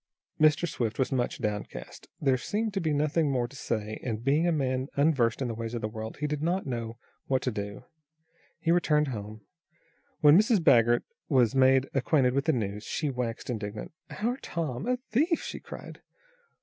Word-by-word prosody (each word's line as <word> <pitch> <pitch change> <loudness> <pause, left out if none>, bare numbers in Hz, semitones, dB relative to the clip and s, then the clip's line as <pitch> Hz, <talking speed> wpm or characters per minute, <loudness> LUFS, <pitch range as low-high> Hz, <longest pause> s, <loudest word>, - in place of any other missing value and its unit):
Mr. 155 +2 +4
Swift 115 -7 -2
was 130 - 0
much 125 -2 0
downcast. 105 -1 -5
There 135 -3 +3
seemed 210 - -2
to 195 - -1
be 160 -2 0
nothing 150 +1 +1
more 125 -3 0
to 135 - -15
say, 110 -4 -3
and, 115 -2 -3
being 145 +6 +3
a - - +3
man 130 -4 0
unversed 140 -5 +2
in - - -1
the 115 - -3
ways 115 +1 -5
of 115 - -3
the 110 - -1
world, 110 0 -7
he 150 - -2
did 150 -1 -2
not 175 +4 0
know 115 -3 -4 0.3
what 130 -1 +1
to 125 - 0
do. 100 -1 -5 0.8
He 165 - +1
returned 150 -4 +3
hone. 110 -2 -6 0.8
When 150 0 +8
Mrs. 220 +1 +4
Baggert 120 -6 +4 0.3
was 125 -6 +4
made 130 0 +4
acquainted 135 -1 +2
with 140 +1 0
the 160 - +4
news, 105 -5 -2
she 150 +4 -2
waxed 125 -2 -4
indignant. 105 -2 -5 0.2
"Our 240 +4 -2
Tom 165 - -4
a 250 0 +1
thief!" 315 +9 +2
she - - -5
cried. - - -10
130 Hz, 190 wpm, -28 LUFS, 115-155 Hz, 0.8 s, When